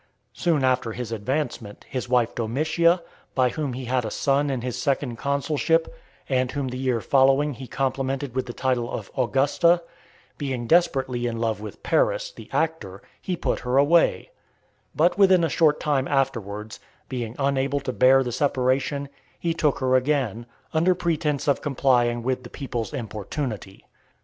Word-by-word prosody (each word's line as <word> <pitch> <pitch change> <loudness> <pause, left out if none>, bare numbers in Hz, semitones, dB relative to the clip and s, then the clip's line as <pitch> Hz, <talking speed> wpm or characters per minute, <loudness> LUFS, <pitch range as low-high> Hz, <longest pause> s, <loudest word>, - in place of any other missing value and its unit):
Soon 165 -6 +1
after 130 -3 +1
his 120 -1 -5
advancement, 115 -1 -3
his 125 -2 -4
wife 120 -2 +2
Domitia, 155 +9 +1 0.3
by 130 -1 +3
whom 145 -1 -3
he 130 +1 -5
had 125 +1 0
a 110 - -3
son 140 +5 +1
in 130 -3 -2
his 125 -1 -4
second 135 -5 -1
consulship, 150 - 0 0.3
and 130 -2 +1
whom 140 -2 -2
the 125 - -5
year 130 -3 0
following 135 +3 +3
he 130 +1 -9
complimented 135 0 -2
with 130 0 -2
the - - -4
title 125 -2 -1
of - - -6
Augusta, 145 +7 +2 0.6
being 130 -5 -3
desperately 130 -6 +2
in 115 -1 -3
love 115 -2 -1
with 105 - -9
Paris, - - +1
the - - -13
actor, 155 - -2 0.2
he 180 -2 -3
put - - -1
her 125 +1 -1
away; 165 - +3 0.6
but 175 +5 +2
within 190 -3 +6
a 165 - +2
short 150 0 +3
time 140 -3 0
afterwards, 110 -6 -2 0.3
being 120 -3 -4
unable 140 0 0
to 135 -2 -4
bear 130 +2 +5
the 125 - -3
separation, 135 +2 0 0.3
he 170 -1 -1
took 150 -3 +1
her 130 -1 0
again, 130 -4 0 0.3
under 170 +3 +3
pretence 155 -5 -1
of 140 - +2
complying 120 -4 +1
with 130 +1 -1
the 120 - -11
people's 120 -5 -4
importunity. 110 -4 -5
135 Hz, 160 wpm, -24 LUFS, 120-150 Hz, 0.6 s, within